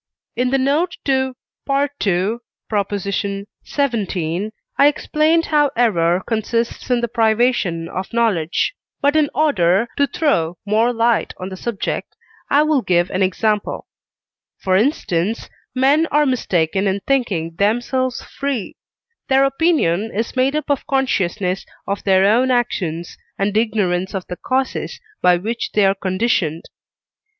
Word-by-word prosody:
In 250 0 +1
the 270 - +2
note 295 +7 +1
to 265 -1 +1 0.3
II. 235 -8 0 1.3
xvii. 205 - -1 0.3
I 280 - +7
explained 310 +2 +2
how 295 -2 +3
error 180 -6 +2
consists 230 +2 -2
in 245 -1 +2
the 235 - 0
privation 220 -7 +1
of 185 +2 -5
knowledge, 215 - +1 0.3
but 285 +2 +2
in 305 -2 +3
order 225 - +2
to 280 - +3
throw 180 - 0
more 220 +4 +2
light 235 -1 +1
on 185 +1 -6
the 190 - -7
subject 220 +2 -4 0.3
I 290 +2 +4
will 305 -3 +2
give 175 -4 +1
an 185 - -1
example. 210 +2 0 0.7
For 185 -1 0
instance, 215 - 0 0.2
men 280 +5 +3
are 300 0 +2
mistaken 195 - 0
in 195 +1 0
thinking 190 -12 -1
themselves 245 +5 0
free; 275 -7 -4 0.5
their 270 0 +5
opinion 275 - +1
is 225 +4 -2
made 260 +3 +2
up 305 -1 -1
of 280 - -1
consciousness 195 -8 0 0.2
of 200 0 -3
their 190 -1 +4
own 240 +6 +3
actions, 180 -9 -1 0.2
and 200 +1 -1
ignorance 200 -4 0
of 190 - -3
the 180 - -7
causes 260 0 -2 0.2
by 180 -1 +5
which 225 +6 -4
they 210 -2 +4
are 195 - +4
conditioned. 185 -4 -1
225 Hz, 135 wpm, -19 LUFS, 185-270 Hz, 1.3 s, I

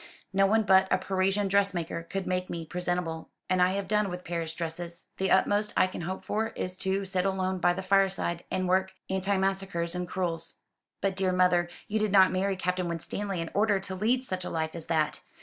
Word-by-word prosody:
No 195 0 +4
one 220 +2 +3
but 190 -1 +5
a - - +3
Parisian 190 +2 0
dressmaker 190 -4 +1
could 190 +3 -4
make 180 0 -1
me 165 -1 -4
presentable; 175 -1 -3 0.2
and 185 0 +2
I 180 +1 +4
have 200 0 -2
done 210 -1 +2
with 180 0 -6
Paris 170 -2 -3
dresses. 170 +1 -4
The 190 0 0
utmost 205 +2 +3
I - - +6
can 185 - -6
hope 185 +3 -4
for 220 +2 -1
is 180 0 -3
to 195 +1 -1
sit 185 -1 0
alone 190 -1 0
by 175 0 +3
the 190 +2 -5
fireside, 190 -3 +2
and 185 0 -1
work 190 +1 +2 0.2
antimacassars 190 -2 0
in 180 0 -3
crewels." 170 -3 -2 0.5
"But, 195 -1 0
dear 190 -1 +1
mother, 180 -1 +3 0.2
you 215 +1 0
did 215 -1 0
not 190 -2 +6
marry 195 +1 0
Captain 180 -1 -1
Winstanley 180 +3 -3
in 165 - -5
order 205 -1 +3
to 190 0 -5
lead 230 +7 +1
such 185 -7 -4
a - - -4
life 160 -1 -2
as 165 -2 -7
that? 160 -2 0
185 Hz, 205 wpm, -28 LUFS, 175-195 Hz, 0.5 s, I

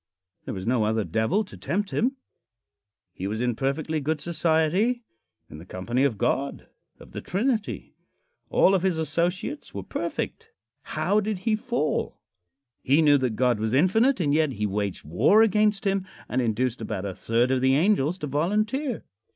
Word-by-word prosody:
There - - -4
was 95 0 -6
no 120 -2 +2
other 110 0 +1
devil 115 - 0
to - - -13
tempt 200 +2 -2
him. 255 +4 0 1.0
He 95 - -4
was 110 +2 -3
in 120 0 +1
perfectly 145 +5 -1
good 150 +2 -1
society 170 +9 +1 0.4
in 75 - -11
the - - -10
company 115 +9 -1
of 120 -7 0
God 140 +6 -1 0.3
of - - -14
the - - -6
Trinity. 220 +3 -2 0.6
All 190 - +4
of 190 - +3
his 185 -3 +1
associates 170 - -2
were - - -4
perfect. 450 0 -4 0.5
How 210 - +2
did 210 -1 -2
he 225 -2 +3
fall? 235 -8 -2 0.6
He 145 +5 +3
knew 145 -2 +5
that 125 -4 -1
God 125 -1 +2
was 110 +3 0
infinite, 220 - +3
and 145 -5 +1
yet 155 -3 +2
he 105 -1 -2
waged 100 -3 -2
war 90 - +4
against 210 -1 +2
him 195 -1 0 0.2
and 130 - 0
induced 120 +2 -1
about 100 -3 -4
a 100 - -3
third 115 +6 +1
of 130 -1 +1
the 130 +1 +4
angels 170 -1 +2
to 150 - -5
volunteer. 210 - -1
155 Hz, 170 wpm, -25 LUFS, 120-205 Hz, 1.0 s, knew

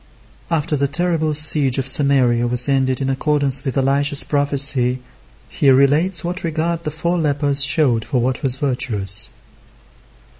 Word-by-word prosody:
After 160 -1 -2
the 140 0 -1
terrible 160 0 -1
siege 145 -3 +4
of 135 -1 -3
Samaria 130 -4 +2
was 125 +1 +1
ended 135 -1 -1
in 135 - -2
accordance 140 -1 +1
with 135 0 -5
Elisha's 140 +2 0
prophecy, 140 -3 0 0.5
he 140 - -1
relates 145 +8 +1
what 180 +2 -6
regard 165 +1 -3
the 155 - -5
four 170 +3 -3
lepers 145 -2 -1
showed 140 -5 +1
for 130 0 -3
what 125 +2 -3
was 130 -4 0
virtuous. 120 -8 +1
140 Hz, 145 wpm, -17 LUFS, 130-150 Hz, 0.5 s, siege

